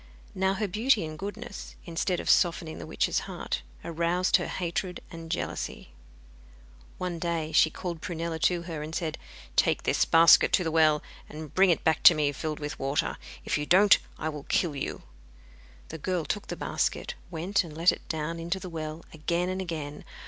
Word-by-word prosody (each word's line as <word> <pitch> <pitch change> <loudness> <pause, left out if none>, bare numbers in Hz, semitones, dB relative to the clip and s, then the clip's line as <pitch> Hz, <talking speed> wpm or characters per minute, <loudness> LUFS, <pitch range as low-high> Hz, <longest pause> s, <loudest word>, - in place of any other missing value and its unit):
Now 190 +1 +1
her 210 +1 -1
beauty 215 0 +2
and 155 0 -6
goodness, 205 +5 -7
instead 175 +1 -1
of - - -6
softening 165 -2 +2
the - - -7
witch's - - +1
heart, - - -3 0.2
aroused 170 +2 +2
her - - -3
hatred 180 0 -3
and 165 -1 -8
jealousy. 60 - -4 1.1
One 180 -2 -3
day 165 -2 -2
she 160 0 +5
called 170 -1 -5
Prunella 165 -1 -3
to 175 +1 +2
her, 165 -3 -5
and 155 +1 -6
said: 160 -3 -3 0.4
'Take - - +3
this - - +2
basket, 165 +1 +7
go - - -23
to 180 - +4
the 165 - -1
well, 155 -2 +4 0.3
and 155 -1 -8
bring 190 0 +5
it 170 - +2
back 160 -2 +2
to 170 - +11
me 150 -2 +1
filled 155 +2 -4
with 150 0 -5
water. 135 +2 -1 0.3
If - - 0
you 150 - -3
don't 200 +3 +7 0.2
I - - -3
will 150 -2 -7
kill 165 -5 +1
you.' 140 - -4 0.9
The 160 - -7
girl 180 0 -1
took 205 - -3
the - - -4
basket, 485 - -1 0.2
went 185 +4 0
and 155 -3 -10
let 170 +2 +5
it - - -7
down 160 +1 -3
into 170 +3 -2
the 185 -1 -7
well 155 -1 -6
again 170 +3 -1
and 185 +1 -2
again. 155 -5 -5
165 Hz, 190 wpm, -28 LUFS, 155-180 Hz, 1.1 s, to